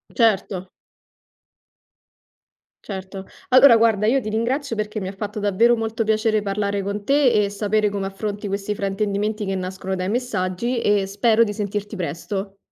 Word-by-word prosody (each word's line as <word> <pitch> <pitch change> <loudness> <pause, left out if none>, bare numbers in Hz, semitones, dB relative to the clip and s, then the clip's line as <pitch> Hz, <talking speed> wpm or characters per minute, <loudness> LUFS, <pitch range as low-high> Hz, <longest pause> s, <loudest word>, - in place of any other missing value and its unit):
Certo. 195 -5 +1 2.2
Certo, 190 -1 -7 0.2
allora 255 -1 +8
guarda, 220 -2 +3
io 265 +4 +3
ti 235 - -7
ringrazio 235 +4 -1
perché 215 0 -3
mi 190 - -4
ha 190 - -5
fatto 210 +2 -5
davvero 210 +4 +3
molto 225 0 -2
piacere 215 0 +1
parlare 200 0 -1
con 200 +1 -4
te 280 -1 +4
e 210 -3 +2
sapere 210 +1 0
come 200 -1 -3
affronti 205 +1 -5
questi 200 +1 -2
fraintendimenti 205 +2 -1
che 195 0 -2
nascono 190 +1 -4
dai 185 0 -2
messaggi 235 0 -1
e 205 -1 +2
spero 220 +3 +3
di 205 - -3
sentirti 205 +1 -4
presto. 195 +3 -4
205 Hz, 150 wpm, -22 LUFS, 195-225 Hz, 2.2 s, allora